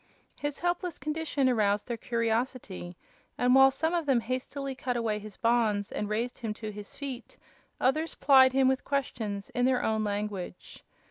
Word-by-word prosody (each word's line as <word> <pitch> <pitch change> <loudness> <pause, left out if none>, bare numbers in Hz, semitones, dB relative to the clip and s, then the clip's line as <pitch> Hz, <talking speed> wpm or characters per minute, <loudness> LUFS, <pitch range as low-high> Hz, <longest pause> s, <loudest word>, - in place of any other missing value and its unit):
His 290 -1 -2
helpless 350 0 -1
condition 300 -3 -1
aroused 210 -4 +2
their 240 - -2
curiosity, 230 -6 -2 0.4
and 250 0 +3
while 270 0 +8
some 320 +5 -1
of 335 -3 -1
them 255 -4 +3
hastily 260 +3 -4
cut 255 -1 -2
away 220 -3 -1
his 210 -1 -10
bonds 225 -4 +1
and 210 - -3
raised 235 +4 -2
him 220 -2 -3
to 215 0 -6
his 205 0 -9
feet, 265 -4 -7 0.4
other 305 +5 +2
plied 265 -2 +7
him 265 0 +3
with 265 0 +1
questions 220 -8 -3
in 245 0 +1
their 255 -1 +2
own 220 0 +1
language. 205 -3 -4
245 Hz, 170 wpm, -29 LUFS, 215-270 Hz, 0.4 s, while